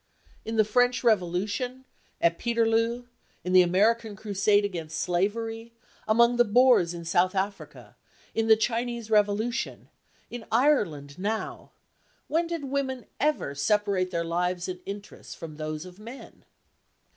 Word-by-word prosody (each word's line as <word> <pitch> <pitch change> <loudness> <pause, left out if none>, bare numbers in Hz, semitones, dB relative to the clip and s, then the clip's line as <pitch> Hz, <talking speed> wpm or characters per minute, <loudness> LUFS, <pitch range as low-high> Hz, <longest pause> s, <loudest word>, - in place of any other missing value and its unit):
In 225 - -4
the 215 -1 +4
French 245 +4 +2
Revolution, 215 +5 0 0.3
at 170 0 +2
Peterloo, 230 +1 +1 0.4
in 180 - -2
the 185 - +8
American 210 +5 +2
crusade 205 0 +1
against 165 -5 -5
slavery, 225 +6 -2 0.3
among 235 +2 +4
the 240 - +6
Boers 235 -6 +4
in 170 -1 -8
South 180 +3 +2
Africa, 195 +1 -4 0.4
in 225 0 0
the 220 - +8
Chinese 235 0 -2
revolution, 210 +3 0 0.4
in 240 -1 -6
Ireland 190 - +1
now, 215 +3 -4 0.6
when 330 +3 0
did 335 -3 -4
women 270 -2 -3
ever 295 - 0
separate 190 +5 +1
their 170 -2 -2
lives 180 +1 -1
and 185 -1 -5
interests 200 +1 -8
from 155 -2 -9
those 155 +1 -5
of 180 +1 -13
men? 235 +5 -12
210 Hz, 135 wpm, -27 LUFS, 180-235 Hz, 0.6 s, the